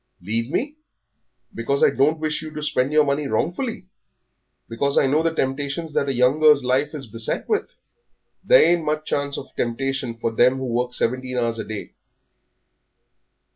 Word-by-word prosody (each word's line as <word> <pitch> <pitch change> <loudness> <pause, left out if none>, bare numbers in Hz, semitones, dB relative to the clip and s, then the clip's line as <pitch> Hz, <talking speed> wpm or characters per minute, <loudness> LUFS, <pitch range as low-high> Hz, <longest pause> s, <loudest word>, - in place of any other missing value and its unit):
"Leave 115 +6 -2
me, 285 - -2 0.8
because 140 +5 -1
I - - +6
don't 150 +4 +2
wish 155 -1 -2
you 155 - -7
to 150 - -4
spend 135 -2 0
your 150 0 +4
money 140 +1 -1
wrongfully, 225 - -2 0.8
because 140 +5 -1
I - - +5
know 145 +4 +2
the 165 0 +1
temptations 145 +2 -2
that 140 - 0
a - - 0
young 125 +4 +3
girl's 150 -3 +5
life 135 +4 0
is 140 -3 -4
beset 115 0 -3
with?" 430 - 0 0.7
"There - - +6
ain't 170 -2 -1
much 155 0 -2
chance 140 0 -1
of 135 - -9
temptation 125 0 -2
for 115 - -2
them 125 +3 +3
who 130 - -4
work 125 0 -2
seventeen 130 +1 -2
hours 115 -1 -1
a - - -4
day." 110 -1 -7
140 Hz, 175 wpm, -22 LUFS, 125-155 Hz, 0.8 s, I